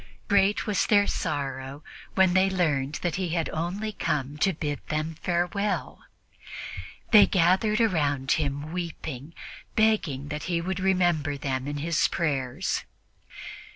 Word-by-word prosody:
Great 200 0 +3
was 210 -3 +1
their 205 -1 +5
sorrow 140 -4 -3 0.3
when 190 -2 +4
they 190 +1 +4
learned 150 -7 0
that 175 -1 0
he 185 -2 -1
had 165 - 0
only 185 +7 -3
come 145 -7 -2
to 170 +6 +2
bid 150 -3 -3
them 155 +1 -2
farewell. 180 +4 -1 1.1
They 215 -3 +8
gathered 190 +4 +3
around 145 - +1
him 145 0 -1
weeping, 165 -4 -5 0.4
begging 185 -11 +1
that 150 0 -4
he 175 -2 0
would 185 +2 -3
remember 175 -6 +1
them 135 -1 -2
in 145 0 -3
his 160 +2 +1
prayers. 135 -7 -1
165 Hz, 130 wpm, -27 LUFS, 145-190 Hz, 1.1 s, They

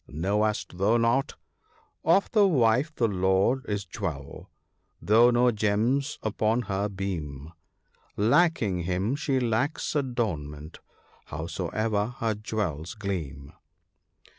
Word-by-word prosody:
Knowest 100 +3 -1
thou 105 +5 +3
not 120 +5 +1 0.2
— - - -36
" - - -47
Of 200 - -3
the 210 -3 +5
wife 130 -2 +2
the 115 - +2
lord 95 +6 +1
is 105 -1 -2
jewel, 70 -5 -6 0.5
though 115 +4 +5
no 120 0 +4
gems 115 +7 0
upon 110 +2 0
her 100 0 -2
beam; 80 -7 -5 0.6
Lacking 110 - +2
him, 95 +8 0
she 145 -2 0
lacks 125 +7 -1
adornment, 85 - -3 0.5
howsoe'er 100 +7 -2
her 115 -1 0
jewels 100 -7 -4
gleam 80 -9 -5
105 Hz, 115 wpm, -27 LUFS, 90-120 Hz, 0.6 s, the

